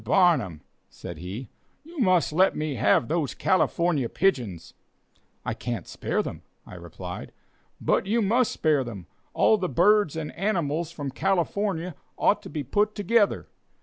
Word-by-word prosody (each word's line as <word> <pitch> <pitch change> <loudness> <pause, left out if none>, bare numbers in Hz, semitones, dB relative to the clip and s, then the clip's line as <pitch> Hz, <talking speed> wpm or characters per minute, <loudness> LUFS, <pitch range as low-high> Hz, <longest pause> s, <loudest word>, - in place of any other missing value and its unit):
Barnum," 145 - +3 0.3
said - - -9
he, 95 +9 -6 0.4
"you 330 +1 -10
must 185 - +3
let 185 +4 +4
me 155 -1 -2
have 120 -1 +3
those 155 -3 -1
California 170 -8 +1
pigeons." 120 - -1 0.7
"I - - -1
can't 120 -7 -4
spare - - -2
them," - - -6 0.2
I - - -12
replied. 90 +1 -8 0.5
"But - - +1
you 225 +4 +2
must 230 +3 +2
spare 150 -4 +2
them. 105 -8 -8 0.3
All 215 - +4
the 185 - -1
birds 185 - +3
and 160 -2 -4
animals 170 -4 -1
from 145 -5 -5
California 185 +1 -1 0.2
ought 205 - +3
to - - -10
be 150 -3 -4
together. 210 - +1
165 Hz, 145 wpm, -26 LUFS, 130-195 Hz, 0.7 s, let